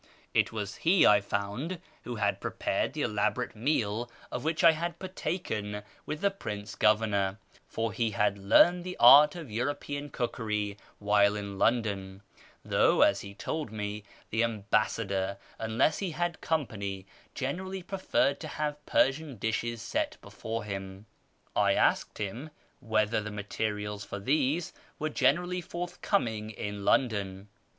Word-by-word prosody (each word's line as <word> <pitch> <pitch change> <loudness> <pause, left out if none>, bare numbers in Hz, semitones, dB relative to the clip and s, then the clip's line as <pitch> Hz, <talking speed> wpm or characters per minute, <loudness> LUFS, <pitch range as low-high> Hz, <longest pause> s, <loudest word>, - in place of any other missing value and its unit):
It - - +3
was 105 -2 -4
he, 175 +2 +4
I 105 0 +6
found, 105 - -3 0.3
who 120 - -4
had 110 - 0
prepared - - -1
the 150 -1 -2
elaborate 105 +3 0
meal 115 -2 0 0.2
of 125 - -4
which 160 +1 0
I 165 - +9
had 170 +2 -3
partaken 110 - -3 0.2
with 155 - -4
the 200 - +3
Prince 105 - -6
Governor, 105 -2 +2 0.3
for 115 -2 -2
he 115 +1 +1
had 105 -2 +1
learned 175 - +5
the 180 0 -6
art 145 +6 +9
of 160 -9 -8
European 145 +4 -3
cookery 105 -5 -2 0.2
while 105 0 +3
in 100 -1 -5
London, 100 -4 0 0.4
though, - - +4
as - - +3
he 100 0 -9
told 155 -1 -4
me, 105 -1 -4 0.3
the 110 +2 +2
ambassador, 105 -3 0 0.2
unless 115 +7 +1
he 195 - -2
had 175 0 -2
company, 100 -11 -2 0.3
generally 185 +8 -3
preferred 185 -7 +1
to 155 - -6
have 150 -1 -3
Persian 140 +1 +2
dishes 115 +2 -2
set - - -1
before 115 +1 -5
him. 95 -1 -6 0.5
I - - +4
asked - - +2
him 115 +9 -4 0.3
whether 110 -3 +1
the 105 - -5
materials 105 0 -3
for - - -6
these 145 - 0 0.2
were 155 - -2
generally 180 +4 +1
forthcoming 170 - -2
in 105 -1 -5
London. 100 -5 +1
110 Hz, 140 wpm, -29 LUFS, 105-150 Hz, 0.5 s, I